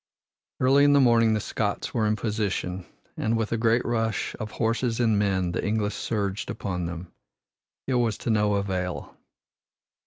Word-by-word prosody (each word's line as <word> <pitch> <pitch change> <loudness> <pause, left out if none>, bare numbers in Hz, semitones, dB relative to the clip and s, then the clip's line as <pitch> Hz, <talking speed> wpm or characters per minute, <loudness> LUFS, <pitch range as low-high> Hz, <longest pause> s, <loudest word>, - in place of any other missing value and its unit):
Early 135 +2 +5
in 145 0 +5
the 140 - +6
morning 115 -4 +4
the - - 0
Scots - - -2
were 110 -2 +1
in 105 - +2
position, 100 -5 -2 0.3
and 115 +1 0
with 110 -1 -2
a - - +2
great 115 +1 +2
rush 115 -2 -1
of 110 - -4
horses 115 +1 0
and 110 -4 +3
men 95 -3 +1
the - - -2
English 105 -1 0
surged 100 -4 -2
upon 90 -5 -3
them. 85 +1 -7 0.7
It 135 - -1
was 120 -4 +1
to 115 - +1
no 105 -1 +2
avail. 95 -3 -3
110 Hz, 165 wpm, -26 LUFS, 100-115 Hz, 0.7 s, the